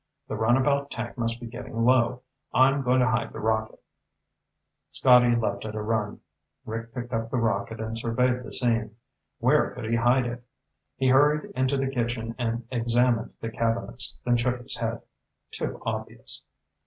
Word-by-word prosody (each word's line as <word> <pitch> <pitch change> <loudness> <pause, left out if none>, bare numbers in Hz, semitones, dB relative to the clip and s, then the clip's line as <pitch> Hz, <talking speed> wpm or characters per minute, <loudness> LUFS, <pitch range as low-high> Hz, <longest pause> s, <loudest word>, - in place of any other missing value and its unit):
The - - -2
runabout 130 +6 +2
tank 120 -2 -5
must 115 -1 -1
be 120 - -8
getting 115 -1 -4
low. 125 0 +3 0.3
I'm 135 +2 +5
going 130 0 +3
to 125 - +3
hide 110 +2 0
the - - -6
rocket." 110 0 -1 1.1
Scotty 125 -2 +5
left 100 -4 -1
at 110 0 -6
a 110 - -2
run. 105 -1 -2 0.4
Rick 115 +1 -5
picked 120 0 -5
up 115 0 -1
the 130 - -1
rocket 110 -1 -1
and 110 0 -4
surveyed 125 +2 0
the - - -9
scene. 115 -3 0 0.4
Where 135 +5 +3
could 125 - -6
he 115 +1 +1
hide 120 +2 +3
it? 120 0 -5 0.5
He 130 -1 +2
hurried 145 +3 +4
into 130 +2 0
the 135 - 0
kitchen 120 -2 -2
and 115 -1 -2
examined 120 -1 +1
the 115 - -4
cabinets, 115 +1 -2
then 120 0 +3
shook 125 +1 0
his 125 - -4
head. 115 0 -3 0.5
Too - - -4
obvious. - - -5
120 Hz, 165 wpm, -26 LUFS, 115-125 Hz, 1.1 s, I'm